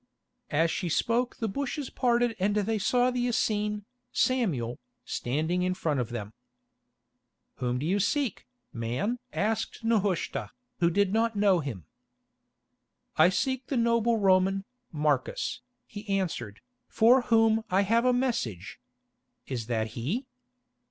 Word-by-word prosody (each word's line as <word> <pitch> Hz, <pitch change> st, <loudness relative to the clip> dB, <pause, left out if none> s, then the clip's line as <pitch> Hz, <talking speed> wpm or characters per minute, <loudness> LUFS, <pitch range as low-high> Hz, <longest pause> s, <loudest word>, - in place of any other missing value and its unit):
As 165 Hz, +3 st, +2 dB
she 175 Hz, -, -2 dB
spoke 235 Hz, +8 st, +1 dB
the 225 Hz, -, -2 dB
bushes 280 Hz, +4 st, -3 dB
parted 240 Hz, -2 st, +1 dB
and 200 Hz, +2 st, +1 dB
they 215 Hz, +1 st, 0 dB
saw 245 Hz, +5 st, +2 dB
the 245 Hz, 0 st, 0 dB
Essene, 210 Hz, -3 st, 0 dB, 0.3 s
Samuel, 165 Hz, -, 0 dB, 0.3 s
standing 160 Hz, +8 st, -1 dB
in 185 Hz, 0 st, 0 dB
front 150 Hz, -6 st, -1 dB
of 120 Hz, -2 st, -2 dB
them. 110 Hz, -3 st, -6 dB, 1.2 s
"Whom 125 Hz, -1 st, -1 dB
do 135 Hz, -, -3 dB
you 190 Hz, +5 st, +1 dB
seek, 250 Hz, +3 st, -1 dB, 0.3 s
man?" 125 Hz, -, -2 dB
asked 220 Hz, +2 st, -2 dB
Nehushta, 205 Hz, -6 st, 0 dB, 0.3 s
who 170 Hz, -1 st, +4 dB
did 200 Hz, +2 st, +1 dB
not 225 Hz, 0 st, +1 dB
know 200 Hz, -3 st, +4 dB
him. 120 Hz, -, -5 dB, 1.3 s
"I -, -, +6 dB
seek 260 Hz, +6 st, -1 dB
the 275 Hz, -, -1 dB
noble 235 Hz, 0 st, +2 dB
Roman, 195 Hz, -1 st, +3 dB, 0.3 s
Marcus," 150 Hz, -5 st, -1 dB, 0.2 s
he 205 Hz, +1 st, -10 dB
answered, 175 Hz, -, -2 dB, 0.3 s
"for 240 Hz, +4 st, +5 dB
whom 225 Hz, -1 st, +4 dB
I 190 Hz, +2 st, +3 dB
have 230 Hz, +4 st, +2 dB
a 250 Hz, -, +4 dB
message. 235 Hz, -, -2 dB, 0.7 s
Is 120 Hz, -5 st, -4 dB
that 110 Hz, -2 st, -1 dB
he?" 145 Hz, -, -3 dB
200 Hz, 130 wpm, -28 LUFS, 155-230 Hz, 1.3 s, I